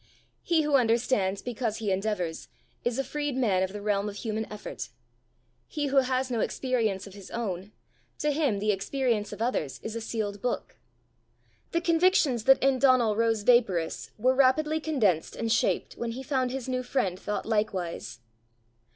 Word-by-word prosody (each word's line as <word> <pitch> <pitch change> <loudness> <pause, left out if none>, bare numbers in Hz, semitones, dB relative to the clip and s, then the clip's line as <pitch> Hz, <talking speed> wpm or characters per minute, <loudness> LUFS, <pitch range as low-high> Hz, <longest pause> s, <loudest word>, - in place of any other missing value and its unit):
He 330 -2 +2
who 295 -2 +4
understands 225 -5 +1
because 235 -2 -2
he 215 -3 -1
endeavours, 190 -4 -2 0.4
is 240 0 0
a 270 - +1
freed 290 0 -3
man 205 -8 +2
of 190 0 0
the 205 0 -7
realm 205 0 0
of 200 - -8
human 220 0 -3
effort. 210 0 -6 0.8
He 290 -2 -2
who - - +3
has 260 0 +2
no 235 - 0
experience 225 -6 0
of 200 - -11
his 200 -2 -11
own, 200 -4 -4 0.5
to 300 - 0
him 285 -8 +1
the 210 +1 +1
experience 220 +1 -1
of 225 - -3
others 160 - -1
is 220 0 -5
a 230 - -3
sealed 210 -3 -3
book. 245 - -3 0.9
The 335 - +1
convictions 330 - +3
that 270 -1 +6
in 270 -1 +3
Donal 250 -5 +4
rose 225 -1 +1
vaporous 205 -9 +2
were 255 +4 +3
rapidly 290 +4 +3
condensed 225 - +1
and 230 -1 -2
shaped 240 - +1
when 230 -1 -3
he 260 +3 -6
found 260 -2 0
his 265 -1 -4
new 255 -1 -1
friend 245 -8 -1
thought 210 - -3
likewise. 180 - -2
230 Hz, 170 wpm, -28 LUFS, 205-265 Hz, 0.9 s, that